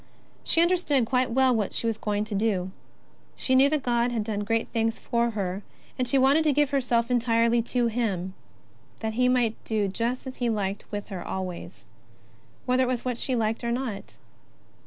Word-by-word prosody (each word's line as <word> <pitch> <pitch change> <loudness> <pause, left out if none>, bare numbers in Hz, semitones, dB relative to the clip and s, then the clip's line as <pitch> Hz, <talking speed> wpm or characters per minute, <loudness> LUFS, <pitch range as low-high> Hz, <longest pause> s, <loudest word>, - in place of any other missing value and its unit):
She 330 - +3
understood 340 -8 +2
quite 250 +2 +1
well 260 +1 +3
what 210 -3 -1
she - - -1
was 225 -1 -1
going 210 -1 -1
to 215 0 -6
do. 195 -3 0 0.6
She 260 - 0
knew 265 +2 +6
that 300 -2 0
God 240 0 +1
had 230 -3 -1
done 210 -1 -3
great 225 +2 0
things 225 -1 0
for 235 -1 0
her, 195 -3 -3 0.3
and 255 - -1
she 270 - +2
wanted 275 +4 +4
to 300 - +4
give 290 0 +2
herself 245 -3 +1
entirely 235 -1 +3
to 240 +1 0
Him, 210 -6 -1 0.7
that 220 -1 -2
He 250 +2 +2
might 240 -3 +1
do 215 -2 0
just 235 +7 -2
as 260 0 -7
He 240 -1 0
liked 200 -2 -3
with 205 0 -5
her 190 -3 -5
always, 185 -2 -6 0.8
whether 255 0 +2
it 255 - +2
was 250 -1 -2
what 245 -2 -1
she 260 - 0
liked 225 0 -1
or 235 - -1
not. 240 -5 -4
235 Hz, 195 wpm, -26 LUFS, 215-255 Hz, 0.8 s, knew